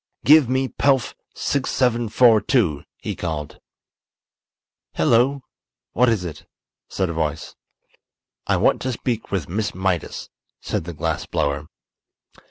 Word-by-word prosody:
"Give 150 -4 +7
me 130 +1 +1
Pelf 135 -1 +1 0.2
6742!" 120 - +2
he - - -5
called. 80 -4 -5 1.4
"Hello! 125 - +2 0.5
What 125 +1 +3
is 105 -6 0
it?" 80 -4 -8 0.4
said 95 - -1
a - - -5
voice. 80 -1 -3 0.9
"I - - +2
want - - +2
to 130 - -1
speak 115 -1 -3
with 95 -7 -2
Miss 100 +4 -2
Mydas," 95 -3 -2 0.3
said - - -3
the 85 - -6
glass 80 0 -3
blower. 75 -2 -1
105 Hz, 115 wpm, -22 LUFS, 80-125 Hz, 1.4 s, Give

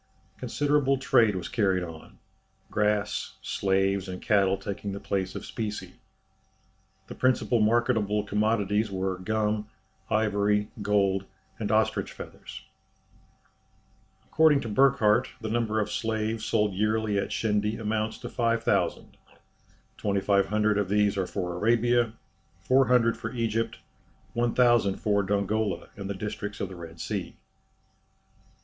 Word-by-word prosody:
Considerable 140 +2 +1
trade 115 -6 +3
was 90 -2 -4
carried 95 -5 +1
on 80 -2 -10 0.5
grass, 105 -1 0
slaves, 95 0 0
and 90 0 -5
cattle 100 -2 +2
taking 100 +1 -5
the 100 - -5
place 95 -2 -2
of - - -6
specie. 105 -2 -5 1.1
The - - -9
principal 130 -2 +1
marketable 110 -2 +2
commodities 105 0 +1
were 95 -1 -2
gum, 105 +1 -1 0.4
ivory, 105 -1 +1
gold, 100 -2 +1 0.3
and 105 -1 -2
ostrich 110 0 +1
feathers. - - -10 1.6
According 155 -3 +4
to 115 - -5
Burckhardt, 120 0 +4
the 110 - -5
number 110 -2 0
of 105 - -1
slaves 110 -1 -2
sold 105 -3 +1
yearly 105 +1 0
at - - -2
Shendy 105 0 0
amounts 110 0 -2
to 120 - -5
5000; 115 -1 0 0.8
2500 100 +1 +1
of 100 -2 -1
these 105 0 +2
are 95 -2 -1
for 90 -3 -3
Arabia, 115 +4 +2 0.5
400 125 -3 +3
for - - -6
Egypt, 115 -1 -1 0.6
1000 120 -4 +3
for 100 -1 +1
Dongola 100 +1 -1
and 100 -2 -6
the 100 - -3
districts 105 +1 -5
of 95 - -3
the 95 - -9
Red 85 -1 -10
Sea. - - -4
105 Hz, 120 wpm, -27 LUFS, 100-115 Hz, 1.6 s, According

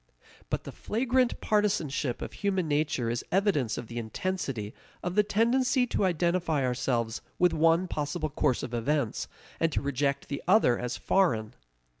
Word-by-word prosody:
But - - -2
the - - -7
flagrant 250 +2 0
partisanship 165 - 0
of - - -7
human 190 -4 -1
nature 145 -4 0
is 120 - -2
evidence 180 - +1
of - - -5
the 120 +1 -5
intensity 120 - -3 0.3
of 180 - -2
the 210 - +5
tendency 245 +5 +2
to 215 - 0
identify 170 -4 +1
ourselves 120 -2 -1 0.2
with 180 -1 +3
one 165 +3 +3
possible 155 0 -2
course 130 -3 +1
of 125 - -5
events, 125 +1 -1 0.3
and 165 0 +2
to - - +1
reject 140 0 -1
the 140 - -4
other 180 - +4
as 125 0 -3
foreign. 115 - +1
155 Hz, 155 wpm, -28 LUFS, 125-190 Hz, 0.3 s, the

